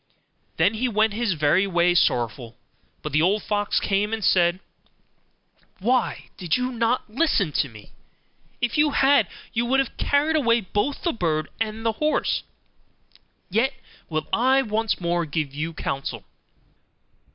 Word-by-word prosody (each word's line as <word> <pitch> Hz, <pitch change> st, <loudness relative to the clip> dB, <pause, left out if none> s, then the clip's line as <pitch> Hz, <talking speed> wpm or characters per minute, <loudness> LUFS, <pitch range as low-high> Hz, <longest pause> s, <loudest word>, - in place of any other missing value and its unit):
Then 175 Hz, +7 st, +3 dB
he 235 Hz, +4 st, -1 dB
went 215 Hz, -1 st, +2 dB
his 225 Hz, -2 st, 0 dB
way 155 Hz, +6 st, +3 dB
very 175 Hz, -1 st, +3 dB
sorrowful; 120 Hz, -5 st, 0 dB, 0.5 s
but 150 Hz, -, -4 dB
the 155 Hz, +3 st, +2 dB
old 200 Hz, +5 st, +2 dB
fox 205 Hz, -1 st, 0 dB
came 205 Hz, +2 st, 0 dB
and 220 Hz, -2 st, -2 dB
said, 175 Hz, 0 st, +3 dB, 1.2 s
'Why 245 Hz, +6 st, 0 dB
did 175 Hz, 0 st, 0 dB
not 250 Hz, -1 st, 0 dB
you 215 Hz, -, -20 dB
listen 210 Hz, -, +2 dB
to 140 Hz, -1 st, 0 dB
me? 110 Hz, -3 st, -14 dB, 0.7 s
If 240 Hz, +4 st, 0 dB
you 300 Hz, 0 st, +5 dB
had, 270 Hz, -6 st, +4 dB, 0.3 s
you 235 Hz, -, +1 dB
would 270 Hz, +2 st, +3 dB
have 270 Hz, -, -1 dB
carried 295 Hz, +3 st, +1 dB
away 235 Hz, -6 st, +3 dB
both 205 Hz, +8 st, -2 dB
the 340 Hz, -, +1 dB
bird 160 Hz, -7 st, -1 dB
and 225 Hz, 0 st, -3 dB
the 225 Hz, -, +3 dB
horse; 305 Hz, 0 st, +1 dB, 1.1 s
yet 250 Hz, +7 st, +1 dB, 0.3 s
will 155 Hz, -1 st, -2 dB
I 260 Hz, +3 st, +4 dB
once 220 Hz, -1 st, -1 dB
more 175 Hz, -1 st, 0 dB
give 150 Hz, -2 st, -3 dB
you 155 Hz, +3 st, -3 dB
counsel. 135 Hz, -3 st, -4 dB
210 Hz, 150 wpm, -24 LUFS, 165-240 Hz, 1.2 s, you